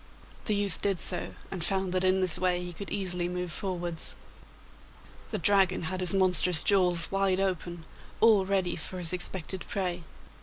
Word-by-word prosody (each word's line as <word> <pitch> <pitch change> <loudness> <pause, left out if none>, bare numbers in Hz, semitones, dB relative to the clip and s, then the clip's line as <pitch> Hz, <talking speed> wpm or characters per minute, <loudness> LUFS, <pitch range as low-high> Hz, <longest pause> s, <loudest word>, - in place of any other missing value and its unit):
The 210 - 0
youth 200 -1 0
did 195 -3 0
so, - - +2 0.2
and 185 -4 -3
found 190 +1 +1
that 185 0 +1
in 185 0 +2
this 185 -3 +2
way 180 -1 +1
he 175 0 -7
could 195 +4 -8
easily 180 -3 -1
move 180 -1 -4
forwards. 175 -4 -3 1.1
The - - -3
Dragon 195 -4 +2
had 185 +3 -4
his 180 -2 0
monstrous 180 -3 +4
jaws 180 -4 +2
wide 195 -1 +1
open, 175 -3 -3 0.3
all 220 -3 +5
ready 190 -2 -1
for 180 +3 -7
his 175 -1 -3
expected 180 0 -2
prey. 180 -3 -2
185 Hz, 165 wpm, -28 LUFS, 175-195 Hz, 1.1 s, all